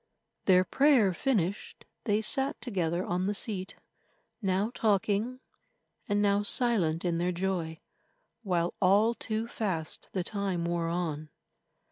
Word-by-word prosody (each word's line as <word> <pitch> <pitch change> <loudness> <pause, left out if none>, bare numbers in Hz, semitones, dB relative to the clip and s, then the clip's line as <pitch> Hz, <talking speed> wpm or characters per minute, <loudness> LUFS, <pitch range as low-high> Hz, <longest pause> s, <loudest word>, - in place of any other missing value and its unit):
Their 185 -1 +5
prayer 255 -5 +4
finished, 200 -4 -2 0.2
they 215 -1 +1
sat 270 +5 0
together 180 -6 -1
on 180 +2 -1
the 205 - 0
seat, 195 -2 -4 0.7
now 195 +2 0
talking, 215 +4 0 0.7
and 205 0 +2
now 200 0 +3
silent 205 -8 +2
in 170 -1 0
their 175 +1 +1
joy, 175 -3 -2 0.6
while 175 -5 0
all 205 +5 +4
too 225 0 -3
fast 185 -9 -3
the 185 - -2
time 195 -4 -2
wore 170 -1 -1
on. 160 -3 -3
195 Hz, 125 wpm, -29 LUFS, 175-215 Hz, 0.7 s, Their